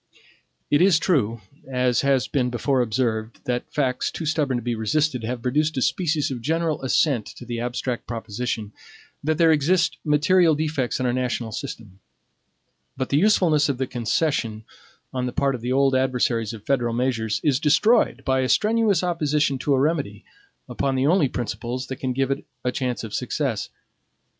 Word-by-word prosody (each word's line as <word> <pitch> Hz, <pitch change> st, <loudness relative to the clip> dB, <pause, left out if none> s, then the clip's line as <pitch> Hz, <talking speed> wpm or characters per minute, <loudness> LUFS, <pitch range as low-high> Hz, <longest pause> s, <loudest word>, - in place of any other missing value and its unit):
It 145 Hz, -, +4 dB
is 185 Hz, -3 st, +5 dB
true, 115 Hz, -, 0 dB, 0.3 s
as 125 Hz, -1 st, +2 dB
has 135 Hz, -5 st, +2 dB
been 125 Hz, -2 st, 0 dB
before 125 Hz, +2 st, 0 dB
observed 110 Hz, -1 st, -1 dB
that 125 Hz, -1 st, -2 dB
facts, 130 Hz, -4 st, 0 dB
too 165 Hz, -, -6 dB
stubborn 150 Hz, -4 st, 0 dB
to 120 Hz, -, -5 dB
be 120 Hz, 0 st, -1 dB
resisted, 125 Hz, +3 st, 0 dB
have 120 Hz, +1 st, -4 dB
produced 150 Hz, +4 st, 0 dB
a -, -, +1 dB
species 155 Hz, -5 st, 0 dB
of 125 Hz, -3 st, -5 dB
general 160 Hz, +3 st, -1 dB
assent 130 Hz, -3 st, +1 dB
to 120 Hz, -, -10 dB
the 120 Hz, -1 st, -4 dB
abstract 120 Hz, 0 st, -3 dB
proposition 110 Hz, -2 st, -4 dB, 0.5 s
that 155 Hz, +1 st, 0 dB
there 165 Hz, -1 st, +5 dB
exist 170 Hz, +4 st, +2 dB
material 160 Hz, +2 st, +4 dB
defects 150 Hz, -5 st, -1 dB
in 130 Hz, -, -1 dB
our 120 Hz, -, +1 dB
national 125 Hz, -2 st, -2 dB
system; 105 Hz, -3 st, -7 dB, 1.0 s
but 130 Hz, -1 st, -2 dB
the 140 Hz, -, +2 dB
usefulness 165 Hz, -7 st, +3 dB
of 135 Hz, -, -1 dB
the 130 Hz, -, -1 dB
concession, 120 Hz, -2 st, -1 dB, 0.5 s
on 125 Hz, -1 st, -1 dB
the -, -, -3 dB
part 140 Hz, -1 st, +1 dB
of 125 Hz, -, -5 dB
the 120 Hz, +2 st, -2 dB
old 135 Hz, 0 st, +3 dB
adversaries 125 Hz, -4 st, +1 dB
of 110 Hz, -3 st, -10 dB
federal 120 Hz, -4 st, 0 dB
measures, 115 Hz, -3 st, 0 dB
is 140 Hz, -4 st, +2 dB
destroyed 160 Hz, +10 st, +3 dB
by 130 Hz, -1 st, +2 dB
a 130 Hz, -1 st, 0 dB
strenuous 215 Hz, -3 st, +2 dB
opposition 150 Hz, -5 st, 0 dB
to 145 Hz, -, -1 dB
a -, -, +1 dB
remedy, 140 Hz, -8 st, -1 dB, 0.4 s
upon 135 Hz, -1 st, -1 dB
the 130 Hz, +1 st, +1 dB
only 160 Hz, -3 st, +3 dB
principles 125 Hz, +1 st, -4 dB
that 130 Hz, -, -6 dB
can 130 Hz, -, -2 dB
give 135 Hz, +1 st, 0 dB
it 135 Hz, -, -2 dB, 0.2 s
a 125 Hz, -, 0 dB
chance 125 Hz, -4 st, -2 dB
of 110 Hz, -, -7 dB
success. -, -, -2 dB
130 Hz, 175 wpm, -23 LUFS, 120-150 Hz, 1.0 s, is